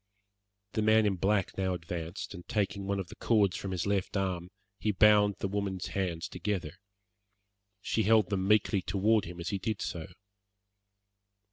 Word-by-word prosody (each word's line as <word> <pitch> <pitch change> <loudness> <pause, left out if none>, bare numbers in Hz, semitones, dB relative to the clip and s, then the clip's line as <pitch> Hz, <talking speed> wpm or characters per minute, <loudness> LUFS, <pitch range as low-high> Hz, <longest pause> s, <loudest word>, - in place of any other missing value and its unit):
The 110 - -1
man 110 0 +4
in 100 -2 +2
black 95 +1 +1
now 95 -1 +1
advanced, 85 +1 -5
and 90 -2 -10
taking 100 -3 -1
one 100 0 0
of 95 - -5
the - - -10
cords 100 -5 +2
from 100 - -4
his 90 -3 -2
left 100 0 0
arm, 90 -2 -2 0.3
he 110 - +1
bound 105 0 +5
the - - -2
woman's 95 -2 -3
hands 90 -2 -2
together. 95 -3 -3 1.1
She 110 - 0
held 110 -2 +4
them 95 -1 0
meekly 105 -1 +3
toward 105 +4 +2
him 85 0 -8
as 85 - -3
he 100 - -2
did 110 +1 -2
so. 80 -2 -4
95 Hz, 165 wpm, -30 LUFS, 90-105 Hz, 1.1 s, bound